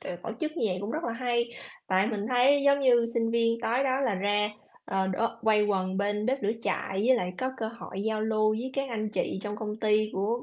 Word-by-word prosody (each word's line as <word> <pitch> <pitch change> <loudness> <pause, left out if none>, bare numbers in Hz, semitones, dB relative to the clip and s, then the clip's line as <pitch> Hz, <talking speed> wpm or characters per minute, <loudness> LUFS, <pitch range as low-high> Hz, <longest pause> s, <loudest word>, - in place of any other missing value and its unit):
ờ, 175 - -5
tổ - - -4
chức 310 -1 -1
như 230 - +1
vậy 180 -1 -2
cũng 200 +2 -4
rất 310 +5 -3
là 235 - -1
hay, 235 0 -1 0.4
tại 190 +1 +2
mình 210 -3 -2
thấy 260 +3 +4
giống 280 0 +5
như 240 -3 +4
sinh 230 -1 +1
viên 230 0 +1
tối 240 +3 +1
đó 265 0 +1
là 250 -7 +1
ra, 205 +2 +1 0.4
ờ, 190 0 0
đố 190 +5 0 0.2
quây 215 -1 +4
quần 190 -2 0
bên 205 +2 0
bếp 270 +2 0
lửa 205 +1 +1
trại - - -1 0.2
với 260 - +6
lại 180 -5 -2
có 260 0 -1
cơ 225 -3 -3
hội 225 -4 -7
giao 220 0 -1
lưu 215 0 +2
với 255 +3 -4
các 275 0 -1
anh 215 -3 -2
chị 200 - -2
trong 210 0 -4
công 210 -1 -4
ty 215 -1 +2
của 220 +5 -1
220 Hz, 250 wpm, -28 LUFS, 205-245 Hz, 0.4 s, với